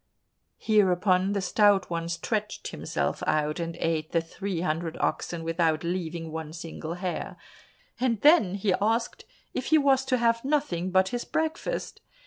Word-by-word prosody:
Hereupon 190 Hz, -2 st, +3 dB
the 200 Hz, -, 0 dB
Stout 200 Hz, 0 st, +3 dB
One 170 Hz, 0 st, -2 dB
stretched 210 Hz, +5 st, -3 dB
himself -, -, -2 dB
out 150 Hz, +1 st, +1 dB
and 165 Hz, 0 st, -3 dB
ate 160 Hz, -2 st, -1 dB
the 170 Hz, -, +4 dB
three 170 Hz, +2 st, -4 dB
hundred 165 Hz, -1 st, -2 dB
oxen 170 Hz, -1 st, -1 dB
without 165 Hz, -1 st, +1 dB
leaving 170 Hz, -2 st, -3 dB
one 160 Hz, -1 st, -6 dB
single 165 Hz, 0 st, -6 dB
hair, 180 Hz, 0 st, -4 dB, 0.6 s
and 240 Hz, -4 st, +1 dB
then 285 Hz, -, +5 dB
he 200 Hz, -1 st, +1 dB
asked 225 Hz, +3 st, 0 dB, 0.3 s
if -, -, -3 dB
he 315 Hz, -, +5 dB
was 275 Hz, -3 st, +3 dB
to 260 Hz, -1 st, +1 dB
have 230 Hz, -1 st, +2 dB
nothing 265 Hz, -, 0 dB
but 190 Hz, +1 st, +3 dB
his 245 Hz, +2 st, -3 dB
breakfast. 320 Hz, +10 st, -3 dB
185 Hz, 150 wpm, -27 LUFS, 165-225 Hz, 0.6 s, then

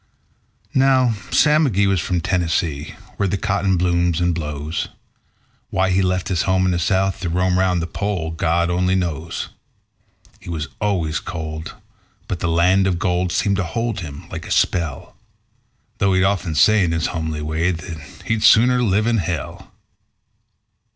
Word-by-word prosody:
Now 130 Hz, -3 st, +4 dB, 0.2 s
Sam 150 Hz, +1 st, +4 dB
McGee 100 Hz, -4 st, +2 dB
was 95 Hz, -2 st, +2 dB
from 90 Hz, +2 st, -1 dB
Tennessee, 80 Hz, -4 st, -1 dB, 0.2 s
where 100 Hz, -, +1 dB
the 95 Hz, +2 st, -1 dB
cotton 95 Hz, -2 st, 0 dB
blooms 85 Hz, -1 st, +1 dB
and 90 Hz, 0 st, +1 dB
blows. 75 Hz, -1 st, -3 dB, 0.8 s
Why 95 Hz, 0 st, +1 dB
he 95 Hz, +1 st, +3 dB
left 90 Hz, -1 st, 0 dB
his 90 Hz, -3 st, +1 dB
home 95 Hz, 0 st, +2 dB
in 90 Hz, -, +2 dB
the 85 Hz, -, 0 dB
South 95 Hz, +3 st, +1 dB
to 90 Hz, -2 st, -3 dB
roam 90 Hz, +1 st, +1 dB
'round 90 Hz, -2 st, +1 dB
the -, -, -1 dB
Pole, 90 Hz, -2 st, -3 dB
God 85 Hz, +2 st, 0 dB
only 90 Hz, +1 st, +1 dB
knows. 85 Hz, -3 st, -3 dB, 0.9 s
He -, -, -11 dB
was 80 Hz, -3 st, -4 dB
always 90 Hz, -7 st, 0 dB
cold, 80 Hz, -2 st, -6 dB, 0.5 s
but 90 Hz, -, -3 dB
the 85 Hz, -, -1 dB
land 90 Hz, +4 st, +3 dB
of 90 Hz, -2 st, 0 dB
gold 90 Hz, 0 st, 0 dB
seemed 100 Hz, +2 st, +1 dB
to 95 Hz, -, 0 dB
hold 115 Hz, +4 st, -2 dB
him 75 Hz, -5 st, -8 dB
like -, -, -7 dB
a -, -, -8 dB
spell; 80 Hz, -7 st, 0 dB, 0.8 s
Though 95 Hz, -2 st, +2 dB
he'd 95 Hz, -, +3 dB
often 95 Hz, -4 st, 0 dB
say 105 Hz, +7 st, +5 dB
in 85 Hz, -2 st, 0 dB
his 80 Hz, -1 st, 0 dB
homely 80 Hz, -2 st, -3 dB
way 80 Hz, +3 st, 0 dB
that 85 Hz, -2 st, -5 dB, 0.2 s
he'd 115 Hz, -1 st, 0 dB
"sooner 125 Hz, +4 st, +5 dB
live 105 Hz, -2 st, +2 dB
in 115 Hz, 0 st, +2 dB
hell". 85 Hz, -4 st, -4 dB
90 Hz, 165 wpm, -20 LUFS, 80-95 Hz, 0.9 s, say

